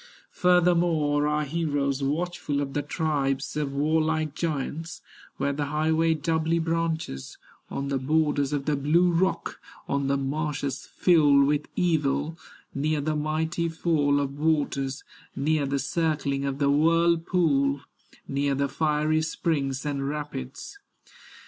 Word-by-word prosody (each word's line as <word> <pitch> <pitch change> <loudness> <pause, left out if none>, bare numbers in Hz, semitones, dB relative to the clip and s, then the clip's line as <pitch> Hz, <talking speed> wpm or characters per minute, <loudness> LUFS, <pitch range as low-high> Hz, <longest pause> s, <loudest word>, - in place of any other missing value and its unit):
Furthermore 170 -5 +3
are 150 0 +1
heroes 145 -3 -1
watchful 150 +1 -1
Of 140 -1 -3
the 145 - 0
tribes 140 -3 -1
of 150 -2 -1
warlike 155 +1 +1
giants, 160 +1 -3 0.4
Where 140 +1 0
the 145 +1 -2
highway 160 +2 +1
doubly 160 +2 0
branches, 165 - -2 0.3
On 140 0 -3
the 135 -1 0
borders 145 0 +1
of 145 -2 -2
the 150 - +1
blue 165 +6 +3
rock, 185 +3 0 0.3
On 140 -1 0
the 140 0 +2
marshes 140 -1 -3
filled 145 -6 +4
with 150 +1 0
evil, 155 -3 +1 0.4
Near 150 +2 0
the 155 +2 -1
mighty 160 +2 -1
fall 155 -3 +1
of 140 0 -3
waters, 145 -3 0 0.3
Near 145 0 +1
the 140 +1 0
circling 140 -1 -1
of 135 -1 -2
the 140 -1 +2
whirlpool, 165 -2 +2 0.5
Near 140 0 0
the 140 +1 0
fiery 155 +1 +1
springs 145 -4 -1
and 140 -1 -2
rapids. 145 - -6
150 Hz, 130 wpm, -26 LUFS, 140-160 Hz, 0.5 s, filled